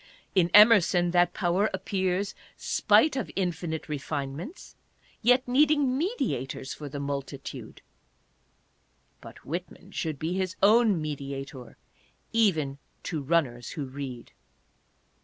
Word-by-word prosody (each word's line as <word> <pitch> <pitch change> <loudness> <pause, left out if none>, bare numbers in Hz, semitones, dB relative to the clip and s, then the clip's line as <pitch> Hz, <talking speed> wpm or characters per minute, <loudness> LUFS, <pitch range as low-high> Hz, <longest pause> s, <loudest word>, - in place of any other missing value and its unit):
In 180 -3 +3
Emerson 200 -5 +6
that 175 0 +3
power 190 +3 +1
appears, 190 +1 -1 0.2
spite 310 - +3
of 265 - -3
infinite 175 -4 -2
refinements, 145 - -5 0.5
yet 250 +3 +4
needing 280 0 +3
mediators 150 - -2
for 145 -1 -8
the 145 +1 -6
multitude. 140 0 -6 1.4
But - - -13
Whitman 180 +4 -6
should 160 -6 -3
be 160 +5 -2
his 185 0 -2
own 215 -2 +5
mediator, 135 -4 -6 0.6
even 160 -12 +1 0.2
to 160 -4 -3
runners 135 -6 0
who 145 - -4
read. 130 -3 -7
170 Hz, 105 wpm, -27 LUFS, 140-205 Hz, 1.4 s, Emerson